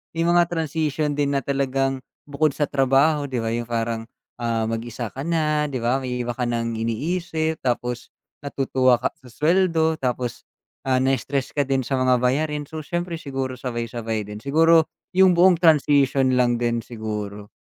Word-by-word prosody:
may 165 Hz, -, 0 dB
mga 175 Hz, +1 st, +4 dB
transition 155 Hz, -2 st, -1 dB
din, 140 Hz, -1 st, +1 dB
na 140 Hz, -, +1 dB
talagang 135 Hz, -1 st, 0 dB, 0.2 s
bukod 145 Hz, 0 st, 0 dB
sa 150 Hz, -, 0 dB
trabaho, 140 Hz, +2 st, +2 dB
'di 130 Hz, -2 st, -3 dB
ba, 115 Hz, -, -1 dB
yung 120 Hz, 0 st, -3 dB
parang, 115 Hz, -1 st, -2 dB, 0.4 s
ah, 115 Hz, -1 st, 0 dB
mag-isa 115 Hz, 0 st, -4 dB
ka 135 Hz, -, -7 dB
na, 150 Hz, -2 st, +1 dB
'di 135 Hz, -, -4 dB
ba, 125 Hz, +3 st, +2 dB
may 125 Hz, -1 st, -3 dB
iba 120 Hz, -, -2 dB
ka 125 Hz, 0 st, -2 dB
nang 115 Hz, -1 st, -1 dB
iniisip, 160 Hz, +7 st, -2 dB
tapos 125 Hz, -1 st, -2 dB, 0.3 s
natutuwa 130 Hz, -2 st, +2 dB
ka -, -, 0 dB
sa 130 Hz, -, -16 dB
suweldo, 160 Hz, +3 st, +1 dB
tapos, 125 Hz, -2 st, -3 dB, 0.4 s
ah, 130 Hz, -, +3 dB
na-stress 135 Hz, +1 st, -1 dB
ka 145 Hz, -, +1 dB
din 135 Hz, -1 st, +1 dB
sa 135 Hz, 0 st, -1 dB
mga 130 Hz, 0 st, +4 dB
bayarin. 150 Hz, +3 st, 0 dB
So, 155 Hz, +2 st, -7 dB
siyempre, 175 Hz, +1 st, -4 dB
siguro 135 Hz, -2 st, -3 dB
sabay-sabay 115 Hz, -3 st, -3 dB
din, 105 Hz, +1 st, -8 dB
siguro 160 Hz, +4 st, +4 dB, 0.3 s
yung 185 Hz, -1 st, +5 dB
buong 180 Hz, -1 st, +5 dB
transition 140 Hz, -4 st, +4 dB
lang 120 Hz, -1 st, +3 dB
din, 120 Hz, 0 st, 0 dB
siguro. 105 Hz, -3 st, -6 dB
135 Hz, 165 wpm, -23 LUFS, 120-155 Hz, 0.4 s, yung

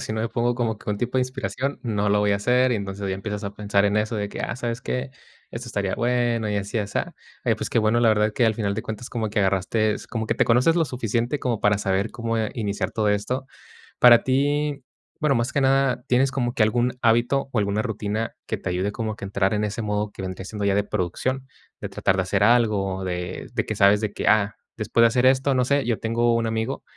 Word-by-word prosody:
si -, -, -4 dB
no 110 Hz, -, -1 dB
me 115 Hz, -, -1 dB
pongo 120 Hz, +1 st, 0 dB
como 115 Hz, -3 st, -1 dB
que -, -, -12 dB
un 105 Hz, -, 0 dB
tipo 125 Hz, +4 st, -1 dB
de -, -, +3 dB
inspiración, 130 Hz, +1 st, -3 dB
no 105 Hz, -4 st, 0 dB
lo 105 Hz, +1 st, +3 dB
voy 105 Hz, 0 st, +2 dB
a -, -, +2 dB
hacer". 125 Hz, +5 st, +2 dB
Y -, -, +1 dB
entonces 100 Hz, -1 st, -5 dB
ya 95 Hz, -, -1 dB
empiezas 105 Hz, +1 st, -5 dB
a 100 Hz, -, -4 dB
pensar 100 Hz, -1 st, +1 dB
en 105 Hz, +1 st, +2 dB
eso, 110 Hz, +2 st, -1 dB
de 100 Hz, -1 st, -3 dB
que -, -, -6 dB
ah, -, -, -3 dB
¿sabes 120 Hz, -1 st, -3 dB
qué?, 125 Hz, +1 st, -3 dB, 0.4 s
esto 120 Hz, +1 st, -7 dB
estaría 100 Hz, -4 st, -1 dB
bueno 120 Hz, -2 st, 0 dB
y 105 Hz, -, 0 dB
así, 100 Hz, +3 st, -2 dB
y -, -, +1 dB
asá. 100 Hz, -1 st, -3 dB, 0.3 s
Oye, -, -, +3 dB
pues, -, -, -4 dB
qué -, -, +2 dB
bueno, 110 Hz, +2 st, +2 dB
la 120 Hz, -, +4 dB
verdad, 105 Hz, -1 st, +3 dB
creo -, -, -29 dB
que 120 Hz, -, +3 dB
al 110 Hz, -, +2 dB
final 105 Hz, -2 st, -1 dB
de 110 Hz, -, -2 dB
cuentas 110 Hz, +2 st, -6 dB
como 110 Hz, -2 st, -2 dB
que 105 Hz, -, -2 dB
agarraste, 100 Hz, +3 st, 0 dB
como 110 Hz, -2 st, -3 dB
que -, -, 0 dB
te -, -, +2 dB
conoces 125 Hz, +8 st, +4 dB
lo 165 Hz, -, +3 dB
suficiente, 120 Hz, +1 st, -1 dB
como 120 Hz, -5 st, -2 dB
para 105 Hz, 0 st, +3 dB
saber 100 Hz, +1 st, 0 dB
cómo 115 Hz, -1 st, -2 dB, 0.2 s
iniciar 100 Hz, -4 st, -2 dB
todo 110 Hz, -2 st, 0 dB
esto. 125 Hz, +6 st, -1 dB, 0.5 s
Para 120 Hz, -1 st, +8 dB
ti, 145 Hz, +1 st, 0 dB, 0.4 s
bueno, 150 Hz, -2 st, +2 dB
más 120 Hz, +1 st, 0 dB
que 140 Hz, -, 0 dB
nada, 135 Hz, -1 st, +2 dB
¿tienes 130 Hz, +1 st, +3 dB
como 120 Hz, -3 st, -1 dB
que -, -, -1 dB
algún 120 Hz, +3 st, +1 dB
hábito 120 Hz, +4 st, +2 dB
o 125 Hz, -, -2 dB
alguna 100 Hz, 0 st, +1 dB
rutina 110 Hz, -1 st, -3 dB
que -, -, -3 dB
te -, -, -5 dB
ayude 90 Hz, +3 st, -1 dB
como 110 Hz, 0 st, -3 dB
a -, -, -11 dB
que 100 Hz, -, -7 dB
entrar 100 Hz, 0 st, 0 dB
en 105 Hz, -, 0 dB
ese 105 Hz, +2 st, -3 dB
modo 105 Hz, 0 st, -2 dB
que -, -, -9 dB
vendría 95 Hz, 0 st, -5 dB
siendo 105 Hz, +1 st, -5 dB
ya 100 Hz, -1 st, +2 dB
de 100 Hz, -, +2 dB
producción?, 105 Hz, +7 st, -2 dB, 0.3 s
de -, -, -4 dB
tratar 95 Hz, -, 0 dB
de -, -, +2 dB
hacer 100 Hz, +2 st, 0 dB
algo, 105 Hz, -5 st, +2 dB
de 90 Hz, +5 st, -4 dB
de 110 Hz, -3 st, -1 dB
que 110 Hz, -, -3 dB
sabes 100 Hz, +1 st, +5 dB
de 105 Hz, -2 st, -1 dB
que, -, -, -3 dB
ah, 100 Hz, -1 st, +3 dB, 0.2 s
después 115 Hz, -, +1 dB
de -, -, +8 dB
hacer 125 Hz, +2 st, +1 dB
esto, 135 Hz, +1 st, +3 dB
no 125 Hz, -, +3 dB
sé. 140 Hz, 0 st, +1 dB
Yo 115 Hz, -4 st, 0 dB
tengo 115 Hz, +1 st, +1 dB
un 115 Hz, 0 st, 0 dB
amigo, 110 Hz, +4 st, -2 dB
110 Hz, 255 wpm, -24 LUFS, 100-125 Hz, 0.5 s, Para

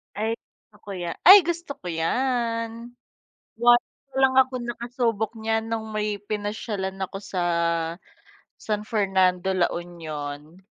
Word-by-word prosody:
Ay 215 Hz, +2 st, -1 dB
gusto 210 Hz, -, -28 dB
ko -, -, -5 dB
ya 175 Hz, -2 st, -3 dB, 0.2 s
ay 385 Hz, +3 st, +13 dB
gusto 340 Hz, -3 st, -3 dB
ko -, -, -6 dB
yan, 230 Hz, +4 st, 0 dB, 0.9 s
once 240 Hz, +1 st, +5 dB, 0.3 s
lang 265 Hz, 0 st, +4 dB
akong 255 Hz, -2 st, +2 dB
nakasubok 235 Hz, -2 st, -1 dB
niyan 220 Hz, 0 st, -1 dB
nung 225 Hz, -1 st, -3 dB
may 210 Hz, -1 st, -2 dB
pinasyalan 205 Hz, -2 st, -3 dB
ako 190 Hz, +1 st, -3 dB
sa, 195 Hz, -2 st, -4 dB, 1.2 s
San 210 Hz, -1 st, -2 dB
Fernando, 190 Hz, -3 st, +1 dB
La 180 Hz, -2 st, +2 dB
Union. 155 Hz, -2 st, -6 dB
215 Hz, 125 wpm, -25 LUFS, 190-235 Hz, 1.2 s, ay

